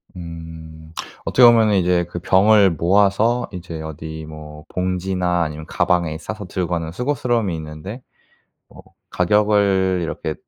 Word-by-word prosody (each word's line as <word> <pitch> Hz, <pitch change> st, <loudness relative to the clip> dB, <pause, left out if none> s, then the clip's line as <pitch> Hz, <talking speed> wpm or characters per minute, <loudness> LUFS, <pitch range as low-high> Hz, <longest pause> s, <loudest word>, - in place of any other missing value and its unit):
음. 80 Hz, -2 st, -10 dB, 0.3 s
어떻게 125 Hz, -, +3 dB
보면은 115 Hz, -3 st, +5 dB
이제 90 Hz, -2 st, +2 dB
그 85 Hz, 0 st, -7 dB
병을 100 Hz, +2 st, +4 dB
모아서 100 Hz, +8 st, +2 dB
이제 85 Hz, -4 st, -7 dB
어디 80 Hz, 0 st, -7 dB
뭐 75 Hz, -1 st, -10 dB
봉지나 90 Hz, -1 st, -1 dB
아니면 75 Hz, 0 st, -5 dB
가방에 85 Hz, -1 st, 0 dB
싸서 105 Hz, +5 st, -7 dB
들고 90 Hz, -1 st, -3 dB
가는 85 Hz, -2 st, -2 dB
수고스러움이 120 Hz, -2 st, -1 dB
있는데 80 Hz, +9 st, -8 dB, 0.7 s
어 -, -, -14 dB, 0.3 s
가격을 100 Hz, -1 st, +2 dB
이렇게 80 Hz, -1 st, -4 dB
90 Hz, 290 characters per minute, -20 LUFS, 80-100 Hz, 0.7 s, 보면은